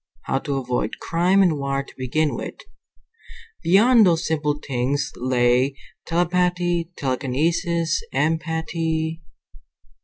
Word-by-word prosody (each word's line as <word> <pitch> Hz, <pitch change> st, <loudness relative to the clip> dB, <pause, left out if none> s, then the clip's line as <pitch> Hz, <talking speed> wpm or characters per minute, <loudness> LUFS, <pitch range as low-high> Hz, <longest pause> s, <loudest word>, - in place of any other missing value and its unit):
How 135 Hz, -, -1 dB
to 140 Hz, -2 st, -3 dB
avoid 125 Hz, -4 st, -2 dB
crime 180 Hz, +4 st, +2 dB
and 160 Hz, -6 st, +2 dB
war 140 Hz, 0 st, -1 dB
to -, -, -16 dB
begin 145 Hz, +4 st, 0 dB
with. -, -, -5 dB, 1.1 s
Beyond 220 Hz, +7 st, +5 dB
those 170 Hz, -4 st, +3 dB
simple 150 Hz, -2 st, 0 dB
things 135 Hz, +2 st, -1 dB
lay 125 Hz, +1 st, +2 dB, 0.3 s
telepathy, 175 Hz, 0 st, +1 dB
telekinesis, 160 Hz, -, 0 dB
empathy.... 160 Hz, 0 st, -1 dB
160 Hz, 100 wpm, -22 LUFS, 135-170 Hz, 1.1 s, Beyond